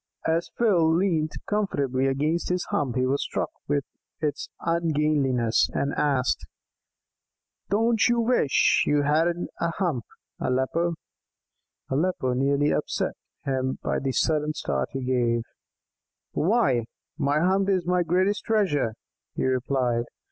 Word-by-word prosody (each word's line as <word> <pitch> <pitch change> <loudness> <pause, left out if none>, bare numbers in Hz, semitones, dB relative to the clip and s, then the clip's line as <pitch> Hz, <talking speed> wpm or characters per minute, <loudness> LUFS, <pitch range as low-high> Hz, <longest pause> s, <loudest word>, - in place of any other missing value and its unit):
As 165 +1 0
Phil 175 -9 +3
leant 165 -4 +1
comfortably 140 -11 0
against 150 +5 0
his 180 0 0
hump 130 -5 0
he 130 0 +2
was 135 +2 +1
struck - - -2 0.2
with 145 -1 +1 0.4
its 150 -2 -2
ungainliness, 150 -8 +1
and 140 +1 0
asked: 135 -4 +1 1.3
"Don't 225 +2 +3
you 240 0 +2
wish 230 - +3
you 145 -1 +3
hadn't 165 +4 +1
a 170 - +1
hump, 165 - -1 0.3
Aleppo?" 145 +7 0 1.0
Aleppo 140 -3 0
nearly 140 +3 +2
upset - - -1 0.3
him 130 -1 -1
by - - 0
the 135 0 -1
sudden 155 +2 +1
start 65 - -2
he 135 -1 -4
gave. 120 -2 +1 0.9
"Why, 165 - +2 0.3
my 145 0 +2
hump 190 +3 +2
is 185 -3 +1
my 180 0 +2
greatest 185 +4 +1
treasure," 180 - +1 0.4
he - - -1
replied. 130 -2 0
150 Hz, 125 wpm, -26 LUFS, 130-175 Hz, 1.3 s, Phil